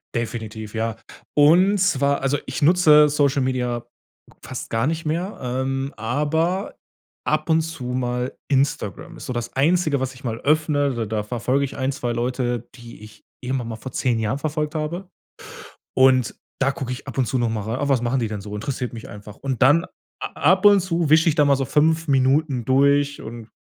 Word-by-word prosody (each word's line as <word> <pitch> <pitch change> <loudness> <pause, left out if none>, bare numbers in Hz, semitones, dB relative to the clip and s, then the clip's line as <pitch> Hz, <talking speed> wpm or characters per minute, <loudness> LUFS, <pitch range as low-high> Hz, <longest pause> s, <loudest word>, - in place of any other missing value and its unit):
Definitiv, 110 -2 -4
ja. 115 0 -2 0.4
Und 175 +7 +5
zwar, 140 -7 +2
also, 135 +1 +1
ich 130 - -4
nutze 150 -2 +6
Social-Media 130 -4 0 0.6
fast 130 0 -7
gar 115 +3 0
nicht 160 +1 -2
mehr, 170 +6 -2
ähm, 135 +2 -2
aber 155 - -1 0.5
ab - - 0
und 160 0 +4
zu 160 -4 -6
mal 125 0 -2
Instagram. 135 -8 -1
Ist - - -9
so 130 - -3
das 120 -1 -5
Einzige, 155 +1 +2
was 130 0 -3
ich 130 - -16
mal 115 -2 -3
öffne. 145 -2 +1
D 115 -1 -2
da 105 0 -2
verfolge 125 +5 -1
ich 135 - -8
1, 130 0 0
2 125 -3 -3
Leute, 120 0 -2
die 120 -3 -12
ich 105 0 -14 0.2
irgendwann 125 -2 -3
mal 115 - -5
vor 125 +4 -8
10 120 -2 0
Jahren 110 +5 -1
verfolgt 150 0 -2
habe. 170 +4 -4 0.9
Und 130 -3 +4 0.3
da 135 - +3
gucke 135 -2 -4
ich 125 - -8
ab - - -7
und 130 - +2
zu 130 - -1
noch 120 -1 +1
mal 110 -2 -2
rei 110 +3 -3
„Ah, 145 +1 -1
was 135 -3 +3
machen 125 +2 0
die 115 - -1
denn 105 -1 -5
so?“ 105 +1 -8
Interessiert 125 +3 -4
mich 115 -2 -9
einfach. 105 -1 -11
Und 135 -3 -4
dann 145 +6 +5 0.4
a - - -2 0.2
ab 190 +1 0
und 205 -1 +7
zu 170 -4 -1
wisch 160 +1 +5
ich 160 - +3
da 150 -2 +4
mal 140 -1 +4
so 135 - -1
5 160 +4 +2
Minuten 135 -1 +2
durch 140 +2 +2
und 115 0 -9
135 Hz, 195 wpm, -22 LUFS, 120-150 Hz, 0.9 s, und